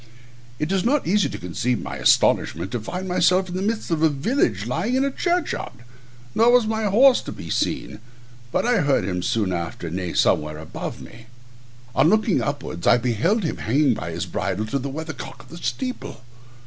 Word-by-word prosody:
It 150 +6 -2
is 195 -1 +1
not 275 +5 +2
easy 205 +3 +2
to - - -6
conceive 115 +7 -2
my - - -6
astonishment 85 +4 +2
to 120 - -2
find 180 - -5
myself 185 +1 +2
in 175 - -5
the 185 - -2
midst 215 -1 -2
of 160 -2 0
a 160 - +5
village, 135 - 0
lying 170 - -1
in 265 +1 +2
a 275 - 0
churchyard; 350 +3 -1 0.6
nor 230 +2 +5
was 245 -2 +5
my 220 0 -1
horse 245 +6 +5
to - - -7
be - - -8
seen, - - -2 0.5
but - - 0
I 245 0 +3
heard 140 -6 +2
him 90 -2 -2
soon 100 0 0
after 85 -1 -4
neigh 90 0 -3
somewhere 75 0 +2
above 80 0 -7
me. 115 +1 -13 0.7
On 160 - +4
looking 215 -1 +2
upwards 140 -11 -4
I - - +7
beheld 125 - +1
him 160 - -2
hanging 135 +3 +2
by 85 -6 -5
his 85 +2 -3
bridle 95 +3 -2
to 140 - +2
the 140 +2 -4
weather 160 +3 -5
cock - - -9
of - - -20
the 170 - -9
steeple. 255 - -4
155 Hz, 200 wpm, -23 LUFS, -, 0.7 s, I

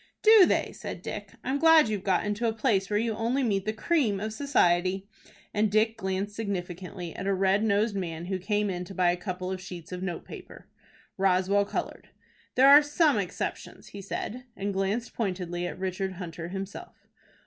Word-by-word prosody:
"Do 430 -4 +8
they?" - - +1
said - - -8
Dick. - - -6
"I'm 265 +3 -1
glad 325 -3 +6
you've 210 -3 -3
got 190 -1 +1
into 210 +3 -1
a 225 - 0
place 215 -4 +1
where 205 - +1
you 225 +1 0
only 235 +5 0
meet 200 -5 0
the 215 - 0
cream 225 -3 +1
of 215 +1 -4
society," 190 -7 +1 0.5
and 210 0 +1
Dick 220 +2 +2
glanced 195 -1 -3
significantly 180 -4 -5
at 195 - -5
a 200 - +2
red 195 +2 +2
nosed 210 0 +1
man 170 -3 -4
who 190 +1 -2
came 205 +1 0
in 180 -1 -4
to 195 - -10
buy 180 -1 +3
a - - 0
couple 185 0 -5
of 185 -1 -4
sheets 180 -3 -9
of 180 0 -5
notepaper. 180 -2 -7 0.5
Roswell 195 +1 +3
colored. - - -5 0.5
"There 260 +2 +6
are 285 +2 +10
some 295 - +2
exceptions," 180 -3 -5
he 200 - -8
said, 235 +5 -5
and 200 +1 -2
glanced 195 +5 -1
pointedly 180 -4 -3
at - - -6
Richard 190 +1 -3
Hunter 170 -2 -7
himself. 195 +2 -8
195 Hz, 185 wpm, -28 LUFS, 185-220 Hz, 0.5 s, are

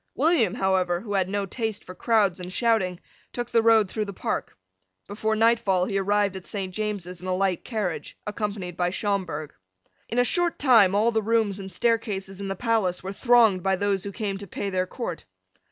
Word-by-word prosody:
William, 265 - +2
however, 185 -2 +1
who 210 -3 -5
had 190 -2 +1
no 200 0 -1
taste 220 +1 -4
for 185 - -9
crowds 200 -3 +2
and 180 0 -6
shouting, 195 -5 +1 0.3
took 240 -1 -5
the 230 - +4
road 225 -2 +5
through 215 +3 -3
the 200 - -6
Park. - - -2 0.5
Before 220 +2 -1
nightfall 215 -5 +3
he 195 0 -1
arrived 200 0 +1
at 190 - -7
Saint 190 -3 -4
James's 195 -4 -4
in 185 - -7
a 185 - 0
light 190 -2 0
carriage, 210 -8 -4
accompanied 205 -4 -4
by 175 0 0
Schomberg. 185 -6 -2 0.6
In 235 - -3
a 245 - +5
short 350 +4 +2
time 225 -8 +5
all 220 +3 +3
the 220 -1 +1
rooms 215 -2 +1
and 190 -1 -7
staircases 200 -2 -1
in 200 - -4
the 195 - -3
palace 210 -5 0
were 190 +1 -5
thronged 230 -5 +4
by 190 +1 +1
those 200 -1 0
who 200 - -5
came 200 -2 -3
to 200 - -8
pay 200 +3 -4
their 185 0 0
court. 180 -6 -5
200 Hz, 200 wpm, -25 LUFS, 185-225 Hz, 0.6 s, road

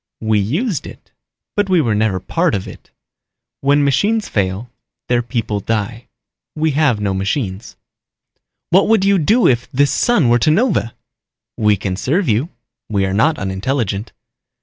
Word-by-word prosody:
"We 110 -1 +1
used 160 - -1
it, - - -14 0.4
but 205 -1 0
we 185 -2 +4
were 120 -8 +1
never 105 -3 +1
part 165 - 0
of 95 - -4
it. - - -12 0.7
When 145 +1 +2
machines 205 - +1
fail, 100 +4 -2 0.4
their 120 -1 +2
people 115 -4 -3
die. 110 +3 -3 0.5
We 155 0 +1
have 140 -6 +2
no 100 -2 -1
machines." 95 +1 -3 1.0
"What 190 +3 +4
would 215 -3 +3
you 200 -1 +3
do 220 +10 +3
if 120 -1 +1
this 140 +2 +2
sun 240 - +2
were 120 +1 +4
to 155 - +2
nova?" 180 - +1 0.6
"We 105 -1 +2
can 95 0 -3
serve 165 - 0
you. 120 +9 +1 0.4
We 100 -2 +1
are 95 - -2
not 140 +10 +2
unintelligent." 100 +2 -2
120 Hz, 155 wpm, -17 LUFS, 105-160 Hz, 1.0 s, we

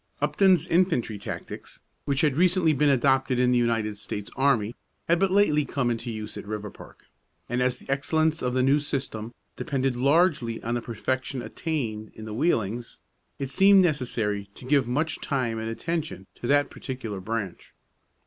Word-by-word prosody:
Upton's 185 -5 +3
infantry 165 - +1
tactics, - - -7 0.2
which 140 -1 +1
had 150 -4 +2
recently 180 -1 +3
been 145 +1 +3
adopted 135 -1 +3
in 125 0 +3
the 125 - +4
United 115 -3 0
States 100 0 -6
Army, 125 -5 +2 0.3
had 170 +1 +3
but 195 0 +3
lately 185 -6 +3
come 130 -4 -1
into 120 +1 -4
use 110 -2 -6
at - - -7
Riverpark; 105 -1 -8 0.4
and 120 +1 -1
as 125 0 +1
the - - -13
excellence 155 +3 +1
of 125 0 -1
the 130 - +3
new 135 +3 +4
system 130 -6 -4 0.2
depended 135 -2 -1
largely 140 -3 +2
on 120 - -2
the 120 - -1
perfection 130 +2 -3
attained 115 -11 -3
in 110 - -9
the 110 - -6
wheelings, 115 - -1 0.4
it 135 -1 -3
seemed 195 +2 +6
necessary 115 - -1
to - - -11
give 135 -2 +3
much 150 +6 -1
time 120 -5 -1
and 110 0 -3
attention 155 - -3
to 120 - -6
that 145 +1 +3
particular 115 -7 -6
branch. 100 -2 -5
130 Hz, 170 wpm, -26 LUFS, 115-150 Hz, 0.4 s, seemed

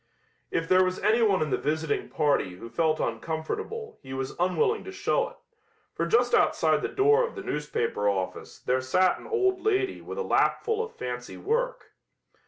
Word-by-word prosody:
If 165 0 -1
there 185 +1 +5
was 185 0 -1
anyone 215 -6 +3
in 150 - -4
the - - +1
visiting 155 0 -1
party 140 -11 +1
who 115 +5 -10
felt 160 -2 +1
uncomfortable 160 - -4
he 130 -1 -7
was 130 0 -4
unwilling 420 - +1
to 385 - -6
show 435 +5 0
it, - - -17 0.6
for 170 - -1
just 245 +6 +3
outside - - +3
the - - -1
door 430 +4 +4
of - - -11
the 385 - -6
newspaper 120 -8 -1
office 95 -2 -3
there 130 +1 0
sat 185 +8 +2
an - - -11
old 380 -5 +1
lady 390 -2 +1
with - - -7
a 475 - -1
lapful 450 -1 +1
of 455 - -9
fancy 125 -1 -5
work. - - -2
185 Hz, 180 wpm, -27 LUFS, -, 0.6 s, there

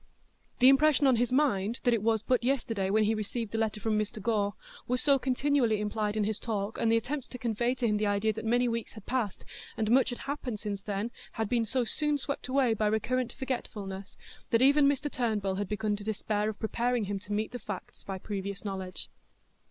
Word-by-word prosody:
The 255 - +6
impression 290 +1 +5
on 260 -3 +5
his 245 +1 +1
mind 240 -6 +2
that 245 - +4
it 230 - +1
was 220 0 +1
but 250 -2 +1
yesterday 230 -7 0
when 215 +2 +3
he 215 +1 +2
received 220 +1 -3
the 225 - -1
letter 220 -1 0
from 215 0 +1
Mr 215 0 -3
Gore 205 -2 0 0.3
was 250 +1 +1
so 280 0 +4
continually 255 -3 +2
implied 210 0 -1
in 215 - +2
his 210 0 -1
talk, 210 -2 -3
and 225 - +2
the 230 - +5
attempts 260 +4 -3
to 250 - -8
convey 240 +1 0
to 250 - -1
him 210 -2 +2
the 210 0 +1
idea 205 +2 +1
that 220 - -6
many 245 +2 +2
weeks 230 -1 -3
had 215 -3 -11
passed 240 -7 -2 0.3
and 220 0 0
much 260 +2 +5
had 245 - -4
happened 275 -6 -4
since 200 -2 -4
then 205 +3 -3 0.2
had 220 -1 -1
been 235 +1 +1
so 250 +3 +1
soon 295 +5 +1
swept 280 -1 -4
away 255 -3 +3
by 215 -1 +1
recurrent 240 +4 0
forgetfulness, 205 -7 -5 0.3
that 230 +2 +4
even 285 +1 +6
Mr 285 +1 0
Turnbull 215 -8 -1
had 205 -1 -2
begun 210 0 0
to 205 - -8
despair 215 0 -1
of 215 - -5
preparing 235 +1 0
him 200 0 -2
to 205 - -12
meet 215 +1 -1
the 245 - -5
facts 205 -5 -7
by 195 -1 -4
previous 200 +1 -5
knowledge. 190 -2 -4
225 Hz, 220 wpm, -30 LUFS, 210-250 Hz, 0.3 s, The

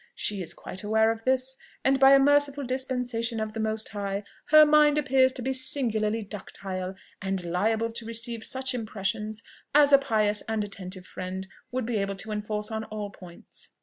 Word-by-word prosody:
She 205 -2 -2
is 170 - -3
quite 185 - -5
aware 220 +1 +3
of 225 0 -7
this, 260 0 +2 0.3
and 270 0 +3
by 270 0 +8
a 275 - +7
merciful 285 0 +3
dispensation 250 -3 -2
of 215 0 -3
the 225 - -5
Most 220 0 -1
High, 200 -1 -3 0.2
her 310 0 +8
mind 300 0 +5
appears 265 -2 +3
to 250 - -6
be 265 +2 0
singularly 225 -5 +2
ductile, 190 -2 -6 0.3
and 190 -1 -2
liable 220 +6 0
to 230 0 -7
receive 230 0 -3
such 260 +1 -2
impressions 215 -1 -3 0.3
as 290 -1 +6
a 275 - +9
pious 215 -5 +1
and 220 -1 0
attentive 185 -2 -8
friend 185 +1 -6 0.2
would 255 -1 -2
be 230 -1 -1
able 195 -1 -1
to 215 +3 -5
enforce 210 +1 -3
on 220 0 -3
all 210 -1 -6
points. 180 -3 -12
220 Hz, 180 wpm, -27 LUFS, 205-260 Hz, 0.3 s, a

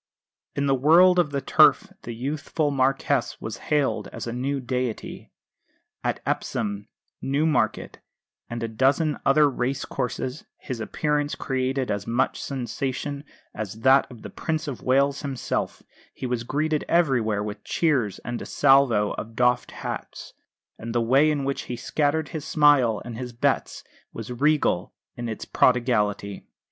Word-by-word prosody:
In 140 - 0
the 135 - +3
world 170 +7 +6
of 170 -4 +2
the 140 -1 -2
Turf - - +4
the 120 - -7
youthful 145 +4 -2
Marquess 135 -1 0
was 110 - -6
hailed 150 -3 +1
as - - -7
a 115 - -4
new 135 +3 -2
deity. 125 -2 -4 0.7
At - - -1
Epsom, 100 0 -2 0.3
Newmarket, 140 -5 0 0.5
and 120 0 -4
a - - -1
dozen 135 +7 +1
other 145 +2 +5
race 130 0 -2
courses 125 +2 -4
his 130 -4 -6
appearance 150 +5 -1
created 130 -1 -1
as 100 -1 -3
much 120 +3 0
sensation 135 +2 -4 0.3
as 110 +1 -6
that 130 +2 +5
of 120 -4 -13
the - - -8
Prince 160 0 -3
of 135 -4 -5
Wales 140 +2 +2
himself; 135 -4 -3 0.3
he 130 - -6
was 125 -2 -2
greeted 155 +3 0
everywhere 120 -11 +2
with 105 0 -6
cheers 130 - 0
and 120 0 -4
a - - -6
salvo 135 -7 +4
of 115 +1 -8
doffed 125 0 +2
hats; - - -7 0.5
and 115 +1 -6
the - - +4
way 135 +6 +4
in 145 -2 0
which 135 0 -2
he 125 - -2
scattered 145 +4 0
his 155 -3 -5
smiles 145 -8 +3
and 120 -1 -7
his 125 -1 -6
bets 115 - -1 0.3
was 115 +1 -7
regal 145 +5 +1 0.2
in 120 -1 -4
its 110 - -5
prodigality. 105 -5 +1
130 Hz, 150 wpm, -25 LUFS, 115-145 Hz, 0.7 s, world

